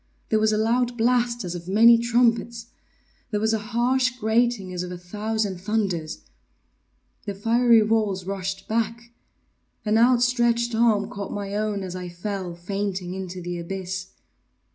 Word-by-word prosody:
There 220 - +3
was 215 0 +3
a 215 - +1
loud 240 +2 +1
blast 240 0 +1
as 175 -2 -4
of 175 -1 -7
many 225 +5 +7
trumpets! 235 0 +1 0.6
There 210 - -1
was 220 +1 +1
a 220 - +1
harsh 245 +4 +1
grating 220 -4 +1
as 180 - -3
of 180 0 -5
a 180 - -6
thousand 205 +1 -3
thunders! 190 -6 -2 1.1
The 200 - -3
fiery 230 +2 +4
walls 210 -4 0
rushed 195 0 -4
back! 230 +1 -2 0.7
An 215 +1 +3
outstretched 240 -1 +3
arm 225 -3 +3
caught 200 -1 -6
my 200 -1 -4
own 210 -2 -1
as 185 -1 -6
I 180 -1 -5
fell, 180 0 -5
fainting, 185 0 -3
into 185 -1 -6
the 175 0 -4
abyss. 185 +1 -5
215 Hz, 150 wpm, -24 LUFS, 190-235 Hz, 1.1 s, many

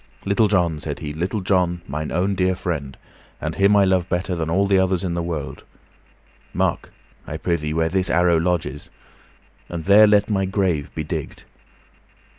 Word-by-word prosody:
"Little 100 +2 +3
John," 90 -6 +1
said - - -5
he, 75 -1 -6
"Little 90 +7 -2
John, 90 -2 +1
mine 75 +2 -4
own 95 +4 0
dear 95 0 +1
friend, 75 -7 -4 0.4
and - - -3
him 100 +1 +3
I 100 -1 +5
love 95 -2 +1
better 90 +2 -1
than 80 -1 -3
all 95 +4 +2 0.2
others 95 -1 0
in 90 -2 -2
the 85 - -1
world, 85 -4 -5 0.9
mark, - - -1 0.4
I 75 - -5
prythee, 80 -2 -2
where 80 0 +1
this 95 +2 0
arrow 85 -1 +3
lodges, 80 -4 -2 0.8
and 85 -2 -5
there 105 +2 +7
let 105 -1 +3
my 95 -3 0
grave 95 -6 -1
be 80 - -2
digged. 75 -2 -6
90 Hz, 170 wpm, -21 LUFS, 80-95 Hz, 0.9 s, there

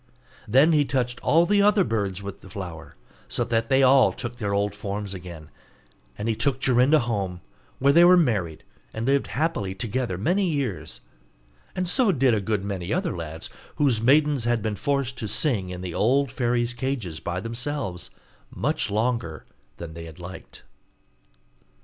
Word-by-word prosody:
Then 135 +9 +5
he 150 -2 +4
touched 125 -3 -2
all 165 +2 +4
the 205 +2 +3
other 205 -1 +4
birds 100 - -2
with 100 -1 -7
the 95 - -13
flower, 90 -4 -8 0.3
so - - -1
that 115 -1 -1
they 135 0 +4
all 130 0 +6
took 120 -1 -7
their 105 -4 -2
old 100 +1 0
forms 100 -1 -5
again; 85 -4 -10 0.7
and 105 - -4
he 115 - +2
took 135 +2 0
Jorinda 130 +4 +4
home, 100 -7 -3 0.4
where 140 +1 +3
they 170 +2 +7
were 180 +1 +7
married, 100 - 0 0.3
and 110 +1 -3
lived 140 +1 +2
happily 125 - -2
together 115 -2 -2
many 180 - +1
years: 140 - -3 0.7
and 185 -1 -1
so 225 +3 +4
did 135 -6 +3
a 105 - +1
good 105 -1 -1
many 95 -2 -4
other 180 -1 -1
lads, 80 -1 -7 0.2
whose 130 -7 +2
maidens 140 0 +3
had 120 -3 +1
been 110 -2 -1
forced 140 -1 -2
to 110 - -3
sing 110 - 0
in 90 0 -6
the 90 -2 -5
old 130 +6 +2
fairy's 120 -1 0
cages 120 - -3
by 90 +1 -3
themselves, 115 -3 -4 0.4
much - - -1
longer 110 -7 -2 0.3
than 85 -2 -8
they 85 0 -8
liked. 90 +3 -11
115 Hz, 170 wpm, -25 LUFS, 95-140 Hz, 0.7 s, they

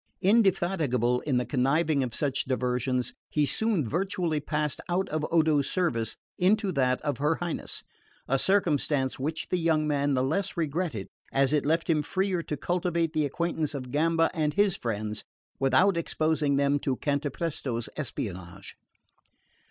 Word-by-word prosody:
Indefatigable 175 - +2
in 135 -4 +2
the 125 - 0
contriving 140 +3 +2
of 120 -3 -2
such 140 -2 0
diversions, 125 -1 -1 0.2
he 150 -1 +2
soon 200 - +1
virtually 175 - -1
passed 150 -1 -2
out 185 +2 +1
of 155 0 -2
Odo's 155 -4 +3
service 115 - -1 0.2
into 200 +2 +3
that 130 -5 +1
of 145 -5 -2
her 150 +3 +2
Highness: 175 -1 -4 0.4
a 135 +1 +2
circumstance 150 -8 +1
which 155 +4 -3
the 180 - +1
young 160 -2 +2
man 145 -1 +1
the 130 - +1
less 190 +8 -1
regretted 155 - -2 0.2
as 135 +1 +2
it 145 -1 +1
left 165 +2 +1
him 155 -3 +2
freer 185 +3 -1
to 150 -2 -4
cultivate 170 0 0
the 155 -2 +1
acquaintance 160 0 -2
of 130 -2 -6
Gamba 165 +3 +2
and 150 -3 0
his 205 -3 +3
friends 110 -2 -3 0.4
without 135 +9 +4
exposing 155 -3 +1
them 140 +1 +2
to 135 -2 -1
Cantapresto's 140 -4 -2
espionage. 95 - -5
150 Hz, 150 wpm, -28 LUFS, 130-170 Hz, 0.4 s, without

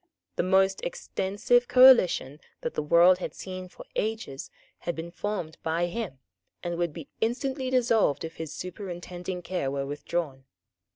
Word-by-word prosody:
The - - +1
most 190 +1 +3
extensive 245 - 0
coalition 245 - +6 0.2
that - - -3
the - - -1
world 170 +4 +6
had - - -5
seen 185 -1 -7
for - - -12
ages 215 -11 -3 0.3
had 175 - -3
been 165 +1 -6
formed 180 -5 -4
by 165 +2 0
him, 175 - -4 0.5
and 175 -1 -2
would 170 -2 0
be 155 -2 -9
instantly 260 +3 -1
dissolved 230 - +2
if 165 - -9
his 160 -2 -5
superintending 180 0 -6
care 165 -5 -2
were 140 0 -2
withdrawn. 145 -1 -3
180 Hz, 150 wpm, -27 LUFS, 160-215 Hz, 0.5 s, coalition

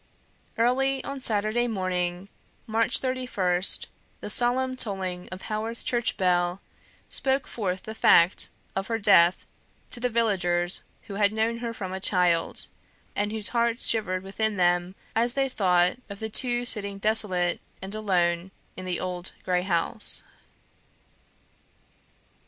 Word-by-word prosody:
Early 265 +3 +1
on 275 0 -5
Saturday 220 0 +1
morning, 185 -3 -2 0.4
March 230 +2 +1
31st, 205 -9 +1 0.3
the - - -5
solemn 255 +2 +1
tolling 190 -6 -4
of 185 0 -8
Haworth 220 +2 -4
church 240 -1 0
bell 180 -1 +1 0.5
spoke 265 0 +1
forth 190 -5 -4
the 220 - -6
fact 175 -4 +4 0.3
of 195 0 -2
her 230 - -1
death 175 -4 +4 0.5
to 245 - -4
the 250 +1 0
villagers 185 -6 +1 0.2
who 200 - -9
had 200 0 +4
known 225 +2 -1
her 235 -1 -3
from 190 -5 -6
a 190 - -4
child, 180 -3 +1 0.5
and 205 0 -1
whose 215 -1 +1
hearts 235 0 +2
shivered 185 -5 0
within 210 +2 -2
them 175 +1 +1 0.2
as 235 +2 +2
they 275 -1 +2
thought 180 -5 +2
of 200 - -7
the 220 - -4
two 245 +1 +2
sitting 200 -4 -1
desolate 195 -4 +2 0.2
and 190 +1 -7
alone 180 -4 0 0.3
in 185 - -7
the 180 -2 -2
old 180 0 -4
grey 180 -1 +1
house. 170 -3 +3
200 Hz, 135 wpm, -26 LUFS, 180-230 Hz, 0.5 s, fact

